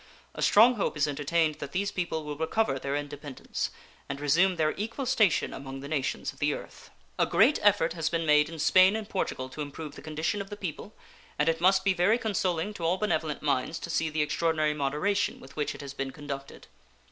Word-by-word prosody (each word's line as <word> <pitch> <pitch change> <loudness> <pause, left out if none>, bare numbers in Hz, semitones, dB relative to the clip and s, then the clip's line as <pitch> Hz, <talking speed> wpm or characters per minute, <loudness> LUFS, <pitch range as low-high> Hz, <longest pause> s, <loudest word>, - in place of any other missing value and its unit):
A - - -7
strong 235 +3 +6
hope 195 - -1
is 150 0 +2
entertained 150 +2 0
that 140 -1 -7
these 200 +2 0
people 170 -3 -2
will 150 0 -5
recover 160 -1 0
their 140 +1 -2
independence 145 -1 -4 0.4
and 140 0 -4
resume 170 +6 +3
their 155 -2 +1
equal 225 +6 -4
station 220 -9 +2
among 135 0 -7
the 140 - -7
nations 145 -3 -2
of - - -20
the - - +1
earth. - - -11 0.3
A - - +3
great 255 +9 +4
effort 205 -6 +3
has 165 -2 -1
been 165 -1 -1
made 150 0 +4
in 165 - -8
Spain 185 +6 +5
and 220 -2 -4
Portugal 130 -10 -2
to 150 - -7
improve 150 +1 -6
the - - -11
condition 155 +6 -2
of 195 - -8
the 205 - -7
people, 190 +2 -6 0.4
and 150 - +1
it 165 0 +1
must 190 +1 +4
be 195 -1 +3
very 185 +6 +3
consoling 200 -4 -1
to 175 - -8
all 170 +3 +2
benevolent 160 -8 -1
minds 140 +2 0
to - - -6
see 160 - +1
the 155 0 0
extraordinary 155 0 +1
moderation 150 +8 0
with 135 +1 -14
which 150 -1 -2
it - - -9
has 140 -1 -7
been 135 -1 -3
conducted. 140 0 -8
160 Hz, 215 wpm, -28 LUFS, 145-190 Hz, 0.4 s, strong